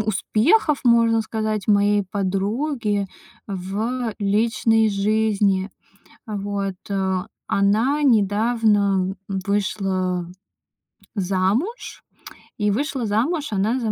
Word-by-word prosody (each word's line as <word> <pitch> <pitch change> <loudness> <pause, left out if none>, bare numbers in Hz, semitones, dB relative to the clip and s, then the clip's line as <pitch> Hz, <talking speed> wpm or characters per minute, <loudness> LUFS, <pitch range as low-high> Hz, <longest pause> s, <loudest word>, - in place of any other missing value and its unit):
успехов, 225 - +2
можно 230 -1 +4
сказать, 215 -2 -3
моей 205 0 +3
подруги 205 +2 -1 0.4
в 215 +5 -3
личной 220 +2 +2
жизни. 205 -1 +1 0.6
Вот, 200 -2 -3 0.2
э. 190 -1 0 0.3
Она 225 +9 +2
недавно, 205 -4 +2
м, 195 -1 -2
вышла 190 -3 -1 0.9
замуж, 200 - -1 0.5
и 210 -1 +1
вышла 265 +2 -2
замуж 275 +10 0
она 210 +6 0
за 220 -2 -1
210 Hz, 85 wpm, -22 LUFS, 195-230 Hz, 0.9 s, можно